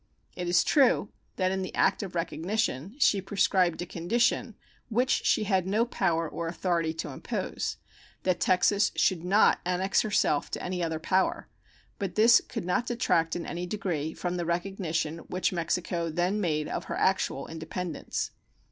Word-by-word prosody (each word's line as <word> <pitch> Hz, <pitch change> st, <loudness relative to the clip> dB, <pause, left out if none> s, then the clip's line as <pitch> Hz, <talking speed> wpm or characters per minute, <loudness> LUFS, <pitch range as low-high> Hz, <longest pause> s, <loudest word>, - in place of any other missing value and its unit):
It 180 Hz, -1 st, -4 dB
is 175 Hz, 0 st, +4 dB
true 260 Hz, -7 st, +3 dB, 0.3 s
that 185 Hz, -1 st, +1 dB
in 190 Hz, 0 st, -1 dB
the 185 Hz, -, -5 dB
act 195 Hz, -, +2 dB
of 190 Hz, -3 st, -6 dB
recognition 175 Hz, -, -2 dB
she 205 Hz, -8 st, +3 dB
prescribed 190 Hz, -3 st, +1 dB
a -, -, -6 dB
condition 230 Hz, +6 st, 0 dB, 0.3 s
which 250 Hz, +4 st, +1 dB
she -, -, +3 dB
had 190 Hz, -3 st, +1 dB
no 215 Hz, +4 st, +2 dB
power 165 Hz, -8 st, 0 dB
or 165 Hz, +2 st, -4 dB
authority 170 Hz, -1 st, 0 dB
to 160 Hz, -1 st, -4 dB
impose -, -, -4 dB, 0.5 s
that 185 Hz, -2 st, +1 dB
Texas 200 Hz, +3 st, +3 dB
should 180 Hz, -4 st, +2 dB
not 195 Hz, +4 st, +4 dB
annex 180 Hz, +2 st, +1 dB
herself 205 Hz, -8 st, +1 dB
to -, -, -5 dB
any 180 Hz, 0 st, -3 dB
other 160 Hz, -1 st, -1 dB
power 185 Hz, +4 st, 0 dB, 0.5 s
but 195 Hz, -3 st, -3 dB
this 230 Hz, +2 st, +6 dB
could -, -, -5 dB
not 185 Hz, +7 st, 0 dB
detract 170 Hz, -9 st, +1 dB
in 175 Hz, -, -4 dB
any 175 Hz, +1 st, -4 dB
degree 165 Hz, -6 st, -3 dB
from 180 Hz, 0 st, -3 dB
the 175 Hz, -, -2 dB
recognition 170 Hz, -3 st, -2 dB
which 185 Hz, +1 st, 0 dB
Mexico 170 Hz, 0 st, -1 dB
then 175 Hz, +6 st, 0 dB
made 155 Hz, -4 st, 0 dB
of -, -, -4 dB
her -, -, -4 dB
actual -, -, +1 dB
independence. 165 Hz, +1 st, -4 dB
180 Hz, 165 wpm, -28 LUFS, 170-200 Hz, 0.5 s, this